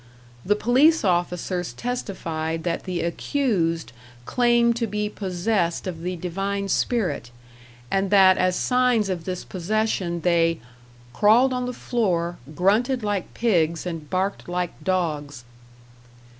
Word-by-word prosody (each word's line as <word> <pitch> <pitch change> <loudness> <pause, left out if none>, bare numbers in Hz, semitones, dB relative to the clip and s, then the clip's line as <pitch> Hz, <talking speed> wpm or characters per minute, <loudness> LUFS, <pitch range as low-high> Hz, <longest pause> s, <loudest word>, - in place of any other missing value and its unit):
The 205 - +2
police 265 +9 +4
officers 180 0 -1
testified 165 -9 -3
that 170 0 -2
the 180 -3 -2
accused 170 - -1 0.3
claimed 240 - +3
to 235 -1 -1
be 210 0 -2
possessed 185 -2 -1
of 175 -3 -5
the 180 +2 -3
divine 195 +3 -3
spirit, 195 - 0 0.6
and 195 0 +1
that 190 -2 +6
as 185 0 +2
signs 250 -4 +2
of 175 -3 -3
this 185 -1 -4
possession 185 -2 -1
they 165 -1 +2 0.5
"crawled 235 - +4
on 250 0 -2
the - - -2
floor, 180 -9 -1 0.2
grunted 220 - +2
like 205 -3 -2
pigs 170 -8 +1
and 165 -4 -5
barked 190 0 -2
like 180 -1 -1
dogs." 150 -8 -2
185 Hz, 125 wpm, -24 LUFS, 170-220 Hz, 0.6 s, that